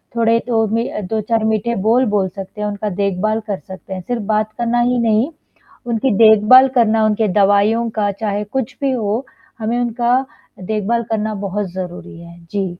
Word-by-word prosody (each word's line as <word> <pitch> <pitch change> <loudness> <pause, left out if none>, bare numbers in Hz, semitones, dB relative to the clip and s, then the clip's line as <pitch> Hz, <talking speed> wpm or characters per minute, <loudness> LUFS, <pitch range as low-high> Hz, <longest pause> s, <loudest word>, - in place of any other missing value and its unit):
थोड़े 230 0 +3
तो 225 -2 +2
में 230 +3 -1
अ, 210 - -4
2-4 220 +3 -1
मीठे 220 +2 0
बोल 250 +3 +4
बोल 190 -2 +2
सकते 195 +3 -9
हैं, 210 - -1
उनका 205 +1 -3
देखभाल 200 +3 0
कर 200 -3 -3
सकते 190 0 -10
हैं। 185 - -5
सिर्फ़ 235 +2 -3
बात 215 0 0
करना 240 0 +1
ही 245 0 +1
नहीं, 230 +4 +2 0.6
उनकी 235 +2 0
देखभाल 225 +4 +7
करना, 225 -2 +3
उनके 215 0 +1
दवाइयों 205 +4 +3
का 205 -1 +1
चाहे 205 0 -3
कुछ 255 -1 -3
भी 275 - +1
हो, 230 0 -1 0.3
हमें 230 +2 -1
उनका 240 +1 +1 0.4
देखभाल 220 +4 -1
करना 215 0 -1
बहुत 195 -1 -3
ज़रूरी 180 -2 -7
है। 170 0 -13
जी। 200 -2 -1
220 Hz, 180 wpm, -18 LUFS, 205-235 Hz, 0.6 s, देखभाल